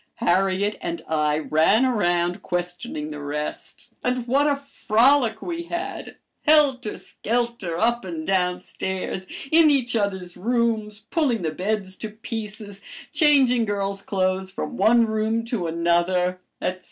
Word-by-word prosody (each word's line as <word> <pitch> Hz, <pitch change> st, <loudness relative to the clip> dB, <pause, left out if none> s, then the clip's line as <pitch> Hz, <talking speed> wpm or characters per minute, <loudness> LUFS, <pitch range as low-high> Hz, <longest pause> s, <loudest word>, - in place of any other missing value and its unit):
Harriet 190 Hz, +3 st, +1 dB
and 170 Hz, -1 st, -4 dB
I 150 Hz, -1 st, +1 dB
ran 160 Hz, +10 st, +3 dB
around 175 Hz, -6 st, +1 dB
questioning 175 Hz, -3 st, -3 dB
the 150 Hz, -, -6 dB
rest, 150 Hz, +1 st, -5 dB, 0.2 s
and 250 Hz, -1 st, 0 dB
what 275 Hz, +4 st, +3 dB
a 290 Hz, -, +3 dB
frolic 255 Hz, -3 st, +2 dB
we 340 Hz, -1 st, -3 dB
had, 355 Hz, +4 st, -5 dB, 0.3 s
helter 275 Hz, -7 st, +4 dB
skelter, 235 Hz, -7 st, -2 dB
up 235 Hz, +4 st, +1 dB
and 165 Hz, -4 st, -5 dB
down 180 Hz, -1 st, +1 dB
stairs, 190 Hz, 0 st, -4 dB, 0.2 s
in 320 Hz, -1 st, +7 dB
each 255 Hz, -5 st, +1 dB
other's 190 Hz, -4 st, -2 dB
rooms, 220 Hz, 0 st, -1 dB
pulling 270 Hz, -, +1 dB
the 160 Hz, -, 0 dB
beds 190 Hz, +3 st, -2 dB
to 220 Hz, -, -5 dB
pieces, 210 Hz, -2 st, -7 dB, 0.3 s
changing 265 Hz, -6 st, +4 dB
girls' 200 Hz, -1 st, -2 dB
clothes 190 Hz, -1 st, -1 dB
from 190 Hz, -, -5 dB
one 235 Hz, 0 st, +5 dB
room 220 Hz, +1 st, 0 dB
to 230 Hz, -7 st, -2 dB
another, 175 Hz, +2 st, +1 dB, 0.2 s
etc. 185 Hz, 0 st, -2 dB
210 Hz, 135 wpm, -24 LUFS, 180-240 Hz, 0.3 s, in